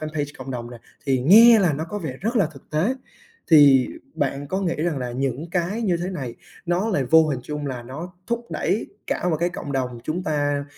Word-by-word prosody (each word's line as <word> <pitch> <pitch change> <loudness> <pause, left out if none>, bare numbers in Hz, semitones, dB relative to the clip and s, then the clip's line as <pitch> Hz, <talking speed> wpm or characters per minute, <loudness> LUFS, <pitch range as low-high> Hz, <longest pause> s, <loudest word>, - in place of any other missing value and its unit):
fanpage 155 -2 -4
cộng 130 0 -7
đồng 120 -1 -5
nè, 120 - -10 0.3
thì 135 -1 +2
nghe 225 - +8
là 180 -6 +3
nó 155 +3 -3
có 205 +4 -4
vẻ 145 -8 -5
rất 225 +5 -1
là 200 -6 +4
thực 145 -3 -15
tế, 165 +12 +1 0.6
thì 140 -5 +7 0.3
bạn 140 0 -2
có 190 - -1
nghĩ 175 -3 0
rằng 155 -2 -1
là 125 -1 -4
những 135 +5 -3
cái 180 +6 -1
như 185 -6 +1
thế 175 +2 -4
này 135 -10 -5 0.3
nó 175 +5 0
lại 150 -11 0
vô 160 +4 +5
hình 135 -4 -2
trung 150 0 -5
là 125 -3 -4
nó 155 +9 -8
thúc 235 0 -3
đẩy - - -1 0.2
cả 180 - -1
một 160 - +1
cái 175 - +2
cộng 170 -5 -6
đồng 125 -3 -2
chúng 170 +4 -2
ta 145 -3 -1
155 Hz, 230 wpm, -23 LUFS, 135-180 Hz, 0.6 s, nghe